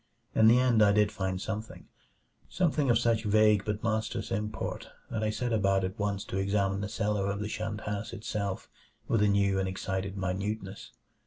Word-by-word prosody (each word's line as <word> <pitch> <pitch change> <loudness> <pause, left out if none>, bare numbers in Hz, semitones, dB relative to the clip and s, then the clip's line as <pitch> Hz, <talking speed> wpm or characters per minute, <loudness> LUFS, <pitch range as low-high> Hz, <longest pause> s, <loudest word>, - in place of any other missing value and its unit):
In 110 - +5
the 115 +2 +7
end 125 -3 +3
I 100 -1 +6
did 105 0 +3
find 95 -1 -2
something; 110 +2 -6 0.6
something 155 -6 +1
of 120 - +5
such 115 -1 +1
vague 105 -1 +4
but 105 +2 -3
monstrous 110 -1 -1
import 105 +2 -3 0.2
that 110 -2 -2
I 110 - +1
set 115 +2 -2
about 100 -3 +2
at 95 +2 -4
once 100 -1 -1
to 95 - -4
examine 100 0 0
the 105 - -3
cellar 105 -2 -1
of 100 0 -2
the 105 - -2
shunned 110 0 -4
house 105 0 -4
itself 100 -2 -4 0.4
with 115 - +2
a 105 - +4
new 100 -1 +2
and 95 - 0
excited 95 +1 -3
minuteness. 95 +2 -3
105 Hz, 185 wpm, -29 LUFS, 100-110 Hz, 0.6 s, the